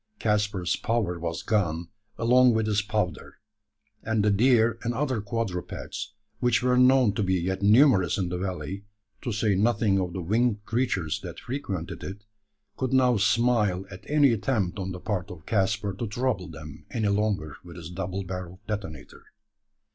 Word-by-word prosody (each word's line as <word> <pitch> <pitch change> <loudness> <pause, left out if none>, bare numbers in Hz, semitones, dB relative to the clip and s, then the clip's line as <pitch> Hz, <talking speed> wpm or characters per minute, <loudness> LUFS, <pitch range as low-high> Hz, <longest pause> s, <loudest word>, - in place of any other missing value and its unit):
Caspar's 105 - 0
power 105 -7 -1
was 85 0 -3
gone 85 -6 0 0.3
along 125 +1 +5
with 110 -1 +1
his 105 -1 +1
powder; 105 -6 -3 0.6
and 110 -2 0
the 105 - +4
deer 115 +1 +3
and 120 0 -2
other 130 -6 0
quadrupeds, 100 -4 -4 0.2
which 120 0 +2
were 125 0 +3
known 125 -3 +5
to 105 - -1
be 95 -2 +1
yet 95 +2 -1
numerous 105 - +5
in 90 -3 -1
the 90 - -3
valley 95 +1 -4 0.4
to 125 - -3
say 105 -1 +1
nothing 105 -1 +2
of 90 -2 -2
the 95 - -4
winged 110 +2 +1
creatures 110 - -1
that - - -8
frequented 100 - -5
it, 100 +2 -7 0.5
could 130 -1 -1
now 125 -2 +4
smile 105 -4 +2
at 95 - -10
any 145 -4 +5
attempt 105 -4 -1
on 95 0 -3
the 90 - -6
part 90 -2 -3
of 80 -4 -10
Caspar 100 -1 0
to 115 +5 -4
trouble 105 -4 -1
them 75 -3 -10
any 110 -3 0
longer 100 -7 -1
with 85 -1 -11
his 85 -1 -8
double 95 +2 -4
barrelled 90 0 -7
detonator. 100 -9 -6
105 Hz, 165 wpm, -26 LUFS, 90-115 Hz, 0.6 s, along